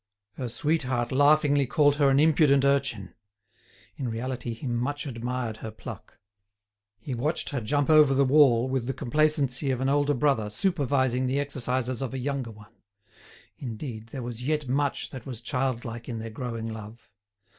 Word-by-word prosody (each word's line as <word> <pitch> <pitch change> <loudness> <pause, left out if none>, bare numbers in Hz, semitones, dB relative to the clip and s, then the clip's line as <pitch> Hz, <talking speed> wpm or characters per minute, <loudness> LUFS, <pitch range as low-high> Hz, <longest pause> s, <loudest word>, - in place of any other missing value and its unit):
Her 125 +1 -5
sweetheart 130 -3 -1
laughingly 145 0 +4
called 145 +1 +3
her 145 -2 +4
an 135 0 +4
impudent 145 -3 +4
urchin. 135 -8 0 0.8
In 130 -4 -3
reality 120 0 -4
he 115 - -9
much 125 +5 -2
admired 120 -3 -3
her 110 - -6
pluck. 110 - -10 0.8
He 115 +6 -6
watched 145 +7 -1
her 135 -4 -3
jump 145 +6 0
over 150 -3 +6
the 140 +1 +4
wall 130 -4 +5
with 130 -2 -2
the 135 - -2
complacency 145 -1 +1
of 130 -2 0
an 130 +1 0
older 145 +1 +2
brother 120 -5 +1
supervising 130 - 0
the 135 +2 0
exercises 130 -3 -2
of 135 -1 -3
a - - -2
younger 135 -2 -3
one. 105 -2 -14 0.9
Indeed, 115 -2 -6
there 130 +1 -6
was 120 -1 -6
yet 150 +1 -1
much 140 +2 -1
that 130 -2 -9
was 125 -4 -6
childlike 120 -2 -3
in 115 - -4
their 110 0 -6
growing 115 -1 -5
love. 110 0 -11
130 Hz, 165 wpm, -27 LUFS, 120-145 Hz, 0.9 s, over